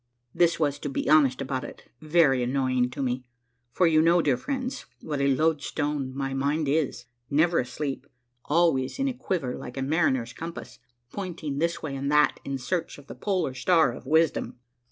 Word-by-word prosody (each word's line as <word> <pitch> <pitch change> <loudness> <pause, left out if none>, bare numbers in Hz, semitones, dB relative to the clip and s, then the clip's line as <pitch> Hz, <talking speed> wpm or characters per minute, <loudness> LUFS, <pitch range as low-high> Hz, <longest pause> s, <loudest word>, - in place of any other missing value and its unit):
This 170 -1 +2
was, 145 -3 0
to 145 - -4
be 135 - -3
honest 140 -4 +4
about 130 -1 -3
it, - - -11
very 155 -5 +3
annoying 130 0 +1
to 135 +2 -4
me; 125 0 -2 0.5
for 180 - +2
you 155 -2 +5
know, 170 +2 +4
dear 145 -6 +2
friends, 260 - -4
what 145 -3 -3
a 140 - +3
loadstone 145 -1 0
my 135 -1 -2
mind 145 +3 0
is, 140 -4 0 0.2
never 160 +4 +3
asleep, 135 +3 -4 0.4
always 150 -5 +2
in 275 0 0
a 265 - -1
quiver 180 - -2
like 125 +2 -8
a 135 - -1
mariner's 130 -5 +1
compass, 165 +1 -8 0.3
pointing 165 -7 -4
this 170 +1 -1
way 145 -3 -4
and 140 +1 -2
that, 150 0 +3
in 140 0 -3
search 165 +6 -3
of 145 - -14
the - - -9
polar 185 -9 -1
star 160 +1 +3
of - - -11
wisdom. 160 -3 +1
145 Hz, 180 wpm, -26 LUFS, 135-165 Hz, 0.5 s, you